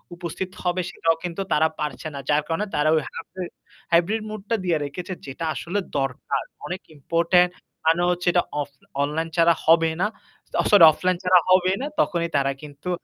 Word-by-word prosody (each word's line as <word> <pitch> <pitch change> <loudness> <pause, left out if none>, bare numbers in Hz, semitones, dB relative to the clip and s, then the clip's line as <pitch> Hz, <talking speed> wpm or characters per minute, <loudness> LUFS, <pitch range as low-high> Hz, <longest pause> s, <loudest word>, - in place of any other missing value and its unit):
উপস্থিত 180 +2 -5
হবে 180 +1 +1
সেটাও 165 0 +1
কিন্তু 175 +2 -3
তারা 160 +1 +4
পারছে 150 0 -4
না। 140 - -5
যার 150 +1 +4
কারণে 165 +6 -1
তারা 150 +1 +2
ওই 155 - +2
হাইব্রি 180 +3 -7 0.5
হাইব্রিড 175 +6 +3
মুডটা 215 +1 -3
দিয়ে 170 -3 +2
রেখেছে 180 +6 -6
যেটা 145 +4 -5
আসলে 190 +4 -2 0.2
দরকার। 135 +1 -2 0.2
অনেক 180 +1 -5
ইম্পোর্টেন্ট 170 +4 +3 0.4
কারণ 165 +2 +4
হচ্ছে 180 0 -3
এটা 175 - +3 0.2
অফ 145 - -4 0.4
অনলাইন 160 +3 -1
ছাড়া 170 0 +6
হবে 165 0 +5
না। 210 - +3 0.5
অ - - -2
সরি 205 -4 +8
অফলাইন 180 +2 0
ছাড়া 185 0 +6
হবেই 185 +1 +4
না 285 - -2
তখনই 170 - +1
তারা 135 0 +1
কিন্তু 145 +4 -8
170 Hz, 175 wpm, -24 LUFS, 155-185 Hz, 0.5 s, সরি